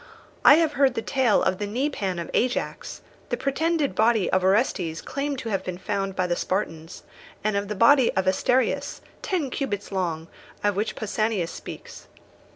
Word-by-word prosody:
I -, -, +9 dB
have 320 Hz, -2 st, +2 dB
heard 270 Hz, -3 st, +3 dB
the 225 Hz, -, -2 dB
tale 260 Hz, -6 st, +2 dB
of 185 Hz, -, 0 dB
the 205 Hz, -, -2 dB
kneepan 210 Hz, -6 st, -2 dB
of 170 Hz, -, -6 dB
Ajax, 250 Hz, 0 st, -2 dB, 0.3 s
the 245 Hz, -, -1 dB
pretended 285 Hz, +3 st, 0 dB
body 220 Hz, -2 st, +2 dB
of 185 Hz, 0 st, +2 dB
Orestes 190 Hz, -5 st, +1 dB
claimed 280 Hz, 0 st, -3 dB
to 230 Hz, -3 st, -5 dB
have 195 Hz, -3 st, -1 dB
been 180 Hz, -1 st, -5 dB
found 195 Hz, 0 st, -3 dB
by 185 Hz, -, 0 dB
the 175 Hz, -1 st, 0 dB
Spartans, 165 Hz, -4 st, -3 dB, 0.4 s
and 215 Hz, -1 st, 0 dB
of 200 Hz, 0 st, -1 dB
the 210 Hz, -, -4 dB
body 265 Hz, +5 st, +5 dB
of 190 Hz, -, +1 dB
Asterius, 245 Hz, +7 st, +1 dB, 0.2 s
ten 320 Hz, -9 st, -2 dB
cubits 205 Hz, -9 st, -3 dB
long, 170 Hz, -4 st, -2 dB, 0.4 s
of 205 Hz, -1 st, +2 dB
which 210 Hz, +3 st, -2 dB
Pausanias 215 Hz, -4 st, -1 dB
speaks. 475 Hz, 0 st, -10 dB
210 Hz, 170 wpm, -25 LUFS, 185-265 Hz, 0.4 s, I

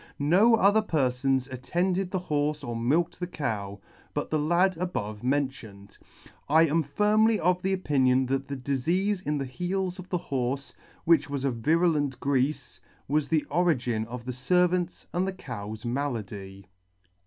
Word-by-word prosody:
No 190 Hz, +11 st, +5 dB
other 210 Hz, 0 st, +4 dB
perfon 135 Hz, -7 st, 0 dB
attended 175 Hz, +9 st, -1 dB
the 185 Hz, -1 st, -2 dB
horfe 150 Hz, -3 st, -1 dB
or 120 Hz, -, -3 dB
milked 155 Hz, +9 st, 0 dB
the 180 Hz, -, -3 dB
cow, 105 Hz, -, -4 dB, 0.4 s
but -, -, -3 dB
the 155 Hz, -, +2 dB
lad 175 Hz, +5 st, +2 dB
above 110 Hz, -, -3 dB
mentioned. 125 Hz, -7 st, -3 dB, 0.5 s
I 160 Hz, +3 st, +6 dB
am 165 Hz, +1 st, +2 dB
firmly 210 Hz, +8 st, +2 dB
of 180 Hz, +1 st, +1 dB
opinion 140 Hz, -9 st, +2 dB
that 135 Hz, +1 st, -2 dB
the 140 Hz, -1 st, -4 dB
difeafe 170 Hz, +10 st, 0 dB
in 150 Hz, 0 st, +1 dB
the 135 Hz, -, -2 dB
heels 180 Hz, +6 st, -3 dB
of 185 Hz, -, -9 dB
the 180 Hz, -, 0 dB
horfe, 135 Hz, -3 st, -3 dB, 0.3 s
which 155 Hz, -4 st, +4 dB
was 140 Hz, -1 st, -2 dB
a 135 Hz, -, +2 dB
virulent 145 Hz, +1 st, +1 dB
greafe, 140 Hz, +2 st, -1 dB, 0.3 s
was 145 Hz, 0 st, 0 dB
the 160 Hz, -2 st, +2 dB
origin 125 Hz, -10 st, +1 dB
of 120 Hz, 0 st, -7 dB
the 130 Hz, -, -3 dB
Yervant's 180 Hz, +7 st, +1 dB
and 180 Hz, +2 st, 0 dB
the 190 Hz, -, -2 dB
cow's 110 Hz, -, -7 dB
malady." 100 Hz, -7 st, -4 dB
145 Hz, 155 wpm, -27 LUFS, 125-180 Hz, 0.5 s, I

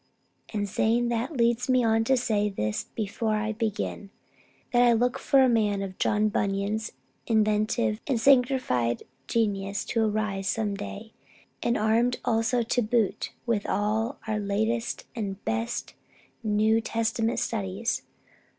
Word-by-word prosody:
And, 205 Hz, -2 st, -1 dB
saying 235 Hz, +4 st, +1 dB
that 240 Hz, +5 st, -2 dB
leads 235 Hz, +2 st, +2 dB
me 255 Hz, -1 st, +4 dB
on 225 Hz, 0 st, +3 dB
to 265 Hz, +2 st, +3 dB
say 210 Hz, -3 st, +1 dB
this 105 Hz, -, -2 dB
before 215 Hz, +1 st, -1 dB
I 215 Hz, +1 st, -1 dB
begin, 215 Hz, -2 st, -3 dB, 0.6 s
that 240 Hz, -, +5 dB
I 240 Hz, -1 st, +6 dB
look 245 Hz, +2 st, +1 dB
for 270 Hz, -1 st, +4 dB
a -, -, +5 dB
man 210 Hz, -4 st, +2 dB
of 190 Hz, -1 st, -7 dB
John 210 Hz, +1 st, +2 dB
Bunyan's 205 Hz, +2 st, -1 dB, 0.3 s
inventive 210 Hz, -, +1 dB
and 255 Hz, -4 st, +1 dB
sanctified 250 Hz, -, +3 dB, 0.2 s
genius 200 Hz, -2 st, 0 dB
to 230 Hz, -, 0 dB
arise 210 Hz, -3 st, -1 dB
some 210 Hz, +1 st, 0 dB
day, 205 Hz, +2 st, -7 dB, 0.5 s
and 240 Hz, -, +1 dB
armed 230 Hz, +3 st, +2 dB
also 225 Hz, +1 st, +2 dB
to 240 Hz, +2 st, 0 dB
boot 225 Hz, -2 st, 0 dB
with 230 Hz, -4 st, 0 dB
all 220 Hz, +5 st, 0 dB
our 215 Hz, -1 st, 0 dB
latest 220 Hz, +3 st, -1 dB
and 200 Hz, -3 st, -5 dB
best 230 Hz, +2 st, -2 dB, 0.5 s
New 220 Hz, 0 st, +2 dB
Testament 225 Hz, +1 st, -1 dB
studies. 210 Hz, +1 st, -2 dB
220 Hz, 140 wpm, -27 LUFS, 205-235 Hz, 0.6 s, I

